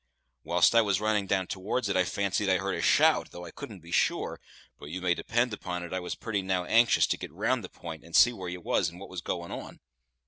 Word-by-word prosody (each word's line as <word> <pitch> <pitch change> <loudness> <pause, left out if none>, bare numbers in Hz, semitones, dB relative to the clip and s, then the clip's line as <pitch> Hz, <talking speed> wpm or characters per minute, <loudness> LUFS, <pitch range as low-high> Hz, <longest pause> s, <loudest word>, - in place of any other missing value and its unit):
Whilst 85 +5 +4
I 115 - +6
was 100 -3 +1
running 105 -2 0
down 95 -1 +1
towards 100 +6 -2
it 95 - -1
I 95 -1 +3
fancied 100 +1 -1
I 95 - +4
heard 100 +1 -2
a - - -2
shout, - - +4
though 90 0 -9
I 85 - -9
couldn't 100 0 -9
be 85 +1 -13
sure, - - 0 0.4
but 70 - -10
you 90 +4 -4
may 90 -1 +2
depend 120 +5 0
upon 90 -3 -4
it 85 - -7
I 95 - -1
was 90 - -5
now - - -26
pretty 110 -4 -1
anxious 105 +6 +4
to - - -1
get - - -7
round - - 0
the - - -7
p'int, 80 -3 -9
and 85 - -8
see 120 +2 +7
where 95 -5 -6
you 90 0 -6
was 85 0 +1
and 85 +2 -13
what 100 - -10
was 95 -2 -6
going 85 -1 -4
on. - - -8
95 Hz, 255 wpm, -28 LUFS, 90-105 Hz, 0.4 s, see